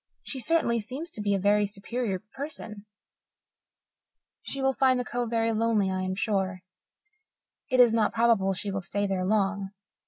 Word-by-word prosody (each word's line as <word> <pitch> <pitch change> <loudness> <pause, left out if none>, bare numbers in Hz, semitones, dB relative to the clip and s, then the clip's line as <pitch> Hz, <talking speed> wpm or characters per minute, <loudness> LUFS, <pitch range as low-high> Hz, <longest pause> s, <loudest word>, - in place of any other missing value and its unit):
She 270 - -5
certainly 255 -5 +1
seems 270 +10 -6
to 215 - -6
be 205 -1 +1
a - - 0
very 205 +1 +3
superior 205 +1 -3 0.2
person; 225 -8 -6 1.5
she 275 - -4
will 270 0 +2
find 260 -1 +3
the 250 - -2
Cove 240 -1 -2
very 230 0 +1
lonely, 220 -3 +1
I 185 0 -1
am 185 0 -2
sure. 190 -3 -1 1.1
It 255 - +2
is 240 -2 +7
not 220 -2 +2
probable 225 -4 +3
she 195 +2 -4
will 195 0 -2
stay 205 +3 -2
there 190 -2 -1
long. 200 0 0
215 Hz, 165 wpm, -27 LUFS, 195-245 Hz, 1.5 s, is